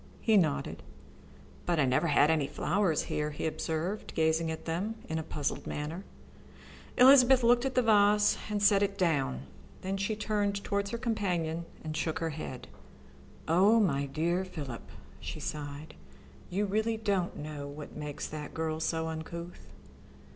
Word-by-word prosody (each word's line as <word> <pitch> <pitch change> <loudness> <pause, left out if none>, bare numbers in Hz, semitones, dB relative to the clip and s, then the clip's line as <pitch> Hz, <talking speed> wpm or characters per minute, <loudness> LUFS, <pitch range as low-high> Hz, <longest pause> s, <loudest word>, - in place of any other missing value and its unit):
He 220 - +3
nodded. 160 - +1 0.9
"But 175 -2 +2
I 140 - +4
never 130 +6 +2
had 150 0 +4
any 155 -4 +1
flowers 185 0 0
here," 150 0 -2
he 150 - -5
observed, 160 +5 -3
gazing 160 0 +2
at 160 - -5
them 185 +7 -2
in 160 0 -2
a - - -4
puzzled 150 -2 -3
manner. 155 +6 -4 0.9
Elizabeth 260 0 +7
looked 240 +2 +4
at 265 - -2
the 250 - +4
vase 210 -1 +5
and 205 -1 -1
set 200 -1 +5
it 200 0 0
down. 140 - 0 0.4
Then 190 +1 -2
she 200 +2 -1
turned 205 -2 -1
towards 200 0 -1
her 235 - -3
companion 180 -9 -1 0.2
and 155 -1 -4
shook 160 0 -1
her 165 -1 -2
head. 75 - -7 0.8
"Oh, 195 +8 +5
my 140 -9 +1
dear 170 +6 0
Philip," 145 -10 -7 0.3
she - - -6
sighed, 145 0 -6 0.6
"you 200 +3 0
really 220 +3 0
don't 200 -5 -1
know 150 -1 -6
what 145 +1 -9
makes 150 -1 -5
that 150 -1 -7
girl 160 -1 -2
so 160 0 -1
uncouth?" 170 +2 -7
170 Hz, 155 wpm, -30 LUFS, 155-205 Hz, 0.9 s, Elizabeth